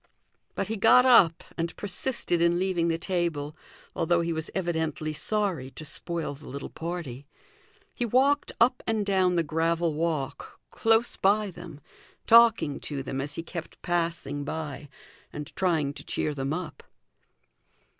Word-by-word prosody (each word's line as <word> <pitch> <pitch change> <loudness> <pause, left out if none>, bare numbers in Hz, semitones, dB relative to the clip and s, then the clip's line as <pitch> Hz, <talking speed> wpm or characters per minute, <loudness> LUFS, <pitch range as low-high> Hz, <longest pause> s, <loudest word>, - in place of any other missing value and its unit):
But - - -2
he 220 +1 -3
got 250 +5 +6
up 195 -10 +6 0.2
and 165 0 -2
persisted 190 -2 -2
in 170 0 +3
leaving 180 -2 +1
the 165 -1 +1
table, 165 -5 -2 0.4
although 170 +1 +2
he 170 0 -1
was 160 0 -4
evidently 160 -4 -1
sorry 185 -7 -1
to 155 - -10
spoil 165 +2 -3
the 140 +2 -13
little 140 +1 -6
party. 160 -6 -6 0.7
He - - -3
walked 265 +5 +2
up 250 +2 +4
and 220 -2 0
down 190 -2 +2
the 170 - +2
gravel 165 +1 0
walk, 150 -3 -3
close 225 +1 +2
by 205 +1 +2
them, 165 -4 -11 0.4
talking 230 -10 +5
to 140 -3 -4
them 135 0 -3
as 145 +2 -4
he 165 - -4
kept 170 -1 -8
passing 165 -5 -1
by 150 -1 -5 0.4
and 150 -1 -8
trying 160 -7 +1
to - - -9
cheer 150 - -2
them 135 0 -3
up. 170 +1 -4
170 Hz, 150 wpm, -27 LUFS, 150-190 Hz, 0.7 s, got